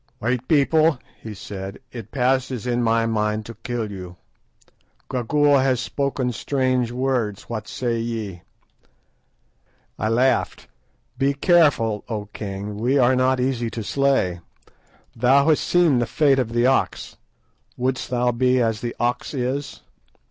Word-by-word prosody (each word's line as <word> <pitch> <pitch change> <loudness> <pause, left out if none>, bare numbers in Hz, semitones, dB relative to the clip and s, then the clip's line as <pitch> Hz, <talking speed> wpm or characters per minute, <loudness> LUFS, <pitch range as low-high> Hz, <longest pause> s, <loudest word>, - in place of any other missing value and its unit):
"White 125 +1 -2
people," 155 0 +3 0.2
he 110 -2 -7
said, 95 0 -7
"it 115 -4 -8
passes 130 -2 0
in 120 -1 0
my 115 -1 +2
mind 105 -1 -1
to 115 - -8
kill 115 -3 -4
you. 90 -2 -8 1.0
Gagool 140 +3 +3
has 130 -2 +2
spoken 135 -1 -2
strange 130 -1 0
words. 125 -5 -1
What 110 -2 -6
say 120 -2 -2
ye?" 110 -6 -4 1.6
I 110 - 0
laughed. 125 +4 +1 0.5
"Be 140 +1 +2
careful, 140 - +3
O 105 -3 -3
king, 100 0 -5
we 125 +6 +1
are 130 -1 +4
not 130 0 +2
easy 125 -2 -1
to 115 0 -5
slay. 135 -9 +1 0.8
Thou 135 +5 +4
hast 155 - +3
seen 170 -8 +3
the 120 - 0
fate 140 -1 +3
of 120 -3 -1
the 120 +1 +2
ox; 130 +1 0 0.6
wouldst 130 +1 -2
thou 125 0 +1
be 125 +2 +2
as 115 -3 0
the 120 -1 -4
ox 120 +4 -1
is?" 130 +2 -3
125 Hz, 140 wpm, -22 LUFS, 115-135 Hz, 1.6 s, are